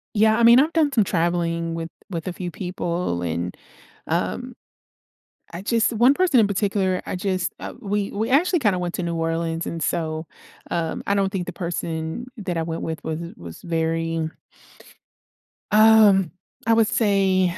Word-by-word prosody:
Yeah, 220 +1 +4
I 235 - +2
mean, 235 +2 +8
I've 310 +4 +2
done 310 -3 +3
some 225 -6 +3
traveling 170 -2 -1
with 165 0 -4 0.2
with 170 -3 -5
a 180 - -2
few 180 0 -5
people 175 - -3
and, 85 +1 -3 0.5
um, - - -2 1.0
I 170 - -5
just 230 +3 +1
one 240 +5 +5
person 350 -8 +3
in 215 - +4
particular, 195 -2 0
I - - -4
just, 185 -1 -1
uh - - -6
we 205 -3 -2
we 220 +2 -2
actually 350 +7 +4
kinda 205 -9 +1
went 175 -1 -3
to 180 - -3
New 170 - -2
Orleans 165 0 -2
and 165 - -4
so, 160 0 -2 0.5
um, 165 -1 -2
I 200 - +2
don't 195 -1 +1
think 190 -3 -2
the 180 - -6
person 170 +2 -4
that 185 -5 -3
I 165 - 0
went 165 0 -4
with 160 -1 -5
was 160 0 -3 0.2
was 85 -1 -10
very 165 -1 -1 1.4
um, 210 -4 +6 0.4
I 230 - +5
would 225 -1 +4
say. 190 -5 +2
180 Hz, 170 wpm, -23 LUFS, 165-210 Hz, 1.4 s, mean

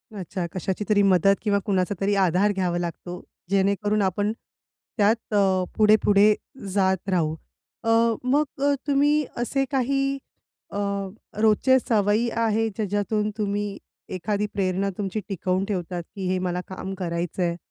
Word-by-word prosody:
अच्छा. 185 -1 -4
कशाची 190 +2 -3
तरी 205 -1 +4
मदत 195 +1 +4
किंवा 205 -2 +1
कुणाचा 195 0 0
तरी 200 +1 +2
आधार 190 +2 +3
घ्यावा 180 -3 -1
लागतो, 175 +1 -5 0.3
जेणेकरून 200 +2 +1
आपण 205 +3 0 0.7
त्यात 215 +1 +1
अ, 190 -2 +3
पुढे-पुढे 210 -1 +5 0.4
जात 190 -1 +1
राहू. 160 -4 +1 0.5
अ, 225 - -1 0.3
मग 285 +4 +2 0.2
अ, 285 0 +4
तुम्ही 290 +1 +3
असे 270 +3 0
काही 275 +1 +1 0.5
अ, 200 - -5 0.6
रोजचे 225 +5 +4
सवयी 220 +1 +1
आहे, 225 -1 +1
ज्याच्यातून 210 0 -1
तुम्ही 205 -1 -2 0.4
एखादी 205 +4 -1
प्रेरणा 195 0 0
तुमची 205 +1 -2
टिकवून 185 0 -1
ठेवतात, 180 -3 -3
की 190 -2 -3
हे 185 0 +1
मला 180 0 -2
काम 190 +1 -6
करायचंय? 170 0 -2
200 Hz, 130 wpm, -24 LUFS, 185-215 Hz, 0.7 s, पुढे-पुढे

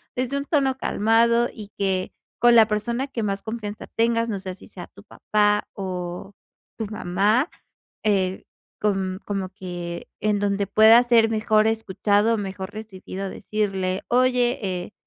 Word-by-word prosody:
desde 255 +2 -1
un 280 - -3
tono 275 -4 +1
calmado, 235 +1 +2
y 210 -3 -9
que 190 -2 -1 0.3
con 240 0 +6
la 225 -2 +7
persona 235 +5 -1
que 235 -5 -4
más 200 -1 -2
confianza 220 -2 -6
tengas, 230 0 +1
no 205 - -2
sé 185 -1 -6
si - - -14
sea 175 -2 -8
tu 200 - -17
papá 210 0 +1
o 180 0 -5 0.4
tu 225 - -3
mamá, 210 - +1 0.6
eh, 190 -3 +1 0.4
com 195 -3 0
como 195 -2 -3
que 175 -3 -7
en 210 0 +1
donde 200 0 0
pueda 220 +4 +7
ser 235 -2 +4
mejor 215 -1 +2
escuchado, 220 0 +1
mejor 190 -1 -5
recibido, 195 -2 -7
decirle: 195 -3 -2
"Oye, 250 0 +2
eh, 185 0 -4
210 Hz, 145 wpm, -23 LUFS, 190-230 Hz, 0.6 s, la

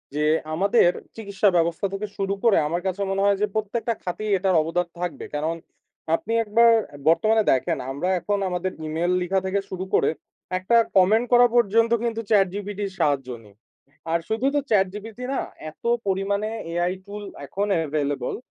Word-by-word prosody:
যে, 150 - 0 0.3
আমাদের 195 +2 +4 0.3
চিকিৎসা 200 -2 +1
ব্যবস্থা 170 +3 0
থেকে 210 +2 -3
শুরু 195 0 -1
করে, 230 -4 +5
আমার 170 +3 -2
কাছে 190 +2 -2
মনে 195 0 0
হয় 200 -1 +3
যে, - - +4
প্রত্যেকটা 225 +2 -1
খাতেই 205 +4 -3
এটার 190 -1 +1
অবদান 175 +3 -1
থাকবে। 175 -2 -4
কারণ, 160 +3 -1 0.6
আপনি 225 +6 -4
একবার 230 +2 +5 0.4
বর্তমানে 215 +6 +3
দেখেন, 130 - 0
আমরা 155 +7 -2
এখন 205 +2 -1
আমাদের 180 +1 -2 0.2
ইমেইল 165 +3 -1
লিখা 190 +2 +1
থেকে 195 +1 0
শুরু 185 0 -4
করে, - - +4 0.5
একটা 210 +6 +2 0.2
কমেন্ট 210 +6 +4
করা 245 0 +7
পর্যন্ত 230 0 +3
কিন্তু, 230 -1 -1
ChatGPT 205 0 +1
'র - - -9
সাহায্য 135 -3 +1 0.2
নিই। 100 -1 -19 0.6
আর 170 - +2
শুধু 225 +4 -1
তো - - +4
ChatGPT 210 +2 0
না, - - 0 0.3
এত - - -32 0.2
পরিমাণে 200 +2 0 0.2
AI 175 +2 0
টুল 205 +1 -7 0.2
এখন 200 +1 -2 0.2
এভেইলেবল 145 -3 -2
195 Hz, 160 wpm, -24 LUFS, 175-215 Hz, 0.6 s, করা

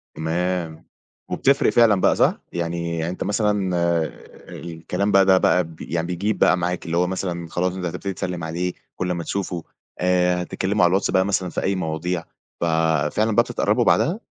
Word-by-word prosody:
تمام. 80 0 -2 0.5
وبتفرِق 140 +1 +3
فعلًا 110 -5 +4
بقى - - +4
صح؟ - - +2
يعني 85 0 -2
يعني 80 +1 -2
أنت - - -4
مثلًا 105 -3 0 0.8
الكلام 85 +4 -3
بقى 95 0 +5
ده 95 -1 +6
بقى 90 0 +3
ب 80 -1 -12
يعني 85 0 -2
بيجيب 95 +4 -2
بقى 90 - +4
معاك، 90 0 -2
اللي 85 0 -1
هو 90 +1 +2
مثلًا 90 -2 -3
خلاص 90 +1 -1
أنت 90 -1 -4
هتبتدي 95 +3 -4
تسلِّم 90 -1 -4
عليه 85 +2 -2 0.2
كل 90 0 -2
ما 85 -1 -2
تشوفه، 90 -4 -3 0.4
آآ، 90 0 +2
هتتكلموا 95 +3 0
على 90 - +6
الواتس 95 +2 +1
بقى 95 0 +3
مثلًا 95 -2 0
في - - -3
أي 95 - +1
مواضيع، 85 0 -2 0.4
ففعلًا 80 +5 +1
بقى - - +6
بتتقربوا - - +1
بعدها؟ 180 +8 +2
90 Hz, 175 wpm, -22 LUFS, 85-95 Hz, 0.8 s, ده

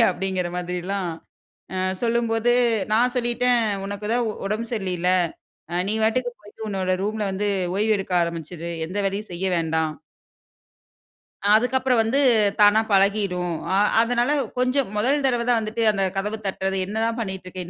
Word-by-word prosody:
வெளிய - - +7
அப்பிடிங்கிற 185 -1 -2
மாதிரிலாம் 180 +1 -3 0.6
அ 185 - -2 0.2
சொல்லும்போது, 235 0 +1 0.4
நான் 245 +3 +3
சொல்லிட்டேன் 245 0 +2 0.3
உனக்கு 205 +1 -5
தான் 240 0 +1 0.2
உடம்பு 215 +3 -2
சரியில்லையில. 185 -5 -1 0.6
அ - - -4
நீ 210 - 0
பாட்டுக்கு 245 +3 +1
போயிட்டு 210 +1 -10
உன்னோட 190 -2 -1
ரூம்ல 215 +1 -2
வந்து 205 +2 -1 0.3
ஓய்வு 215 +1 +2
எடுக்க 190 -1 -3
ஆரம்பிச்சிரு! 170 0 -5 0.2
எந்த 185 +5 -5
வேலையும் 200 +2 -4
செய்ய 175 +2 -4
வேண்டாம். 160 -1 0 1.6
அதுக்கப்புறம் 250 +2 +2
வந்து 235 +5 +1 0.4
தானா 205 +1 +7
பழகிடும். 195 -3 +2 0.2
அ - - +3 0.3
அதனால 240 +3 +1 0.3
கொஞ்சம் 255 0 +1
முதல் 275 +7 +1
தடவ 245 -3 +2
தான் 235 -2 +4
வந்துட்டு 220 +1 -2
அந்த 195 -2 -1
கதவ 210 +3 -2
தட்டுறது 195 0 -2
என்னதான் 225 +3 -1
பண்ணிட்டு 190 -4 -4
இருக்க! 185 0 -8
210 Hz, 140 wpm, -23 LUFS, 185-235 Hz, 1.6 s, வெளிய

